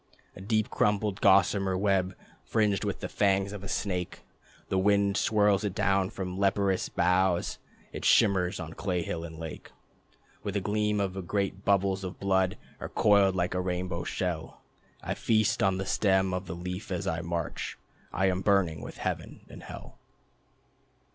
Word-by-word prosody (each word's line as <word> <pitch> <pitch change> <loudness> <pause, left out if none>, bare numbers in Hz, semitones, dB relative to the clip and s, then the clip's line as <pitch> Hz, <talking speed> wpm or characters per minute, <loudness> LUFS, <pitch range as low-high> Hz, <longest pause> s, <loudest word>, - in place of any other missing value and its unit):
A - - -10
deep 110 +2 0
crumpled 105 -1 +1
gossamer 95 -1 +4
web, 95 -1 +1 0.3
Fringed 105 -3 +1
with - - -3
the - - -3
fangs 100 0 +1
of 100 -2 -7
a - - -6
snake. 90 -3 -2 0.5
The 95 - +1
wind 100 0 +3
swirls 105 -2 +3
it 100 -2 -2
down 100 -3 +2
from 90 -1 -5
the 95 - -4
leperous 100 -1 +1
boughs. 90 0 +1 0.3
It - - -6
shimmers 95 -3 +3
on 80 -1 -6
clay 90 -2 -2
hill 85 0 -4
and 80 -1 -8
lake, 80 -1 -8 0.7
With - - -4
the - - +2
gleam 105 +1 0
of 95 -2 -3
great 100 -1 -1
bubbles 100 -1 +2
of 95 +1 -6
blood, 95 -1 +1 0.2
Or - - -5
coiled 100 -2 +4
like 90 -1 0
a 90 - 0
rainbow 90 -1 -2
shell.... 85 -4 -3 0.4
I - - -2
feast 110 -2 +1
on 95 -1 +2
the 95 - -3
stem 95 -2 +2
of 90 +1 -3
the 90 - -5
Leaf 90 +3 -6
as 90 - -2
I 80 +1 -1
march. 85 -2 -4 0.3
I 95 - +1
am 95 -1 +1
burning 95 -7 +2
with - - -8
Heaven - - -4
and - - -11
Hell. - - -10
95 Hz, 170 wpm, -29 LUFS, 90-100 Hz, 0.7 s, gossamer